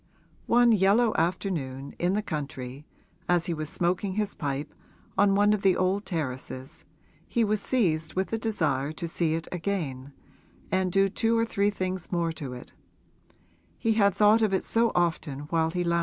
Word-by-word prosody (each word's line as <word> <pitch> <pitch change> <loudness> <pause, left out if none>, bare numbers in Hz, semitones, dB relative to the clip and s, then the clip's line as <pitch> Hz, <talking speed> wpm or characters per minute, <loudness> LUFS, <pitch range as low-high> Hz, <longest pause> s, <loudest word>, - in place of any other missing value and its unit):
One 240 0 +5
yellow 215 +3 +4
afternoon, 160 -6 -2
in 175 +2 +1
the 210 +1 0
country, 140 -4 -6 0.4
as 175 -1 +3
he 175 - -1
was 155 -1 -4
smoking 180 +3 0
his 210 0 -1
pipe 145 -1 -4 0.4
on 195 0 +4
one 205 +1 +4
of 210 - -1
the 190 -2 +3
old 190 +2 0
terraces 130 -6 -5 0.4
he 235 - +1
was 210 -1 +1
seized 165 -12 0
with 190 +1 0
the 225 - -2
desire 155 - 0
to 170 - -5
see 165 -1 0
it 165 -1 -4
again 160 -8 -3 0.6
and 185 -1 +1
do 195 +2 +4
two 225 +4 +1
or 230 - +2
three 205 -2 +1
things 185 -3 -3
more 170 -2 0
to 145 -5 -6
it: 125 - -11 1.0
he 225 - +1
had 200 -3 +3
thought 210 +2 +5
of 210 -3 +2
it - - -1
so 230 0 +2
often 160 -5 0
while 160 -1 +2
he 175 +2 -1
lounged 170 - 0
there. 170 - +2
180 Hz, 180 wpm, -27 LUFS, 155-205 Hz, 1.0 s, One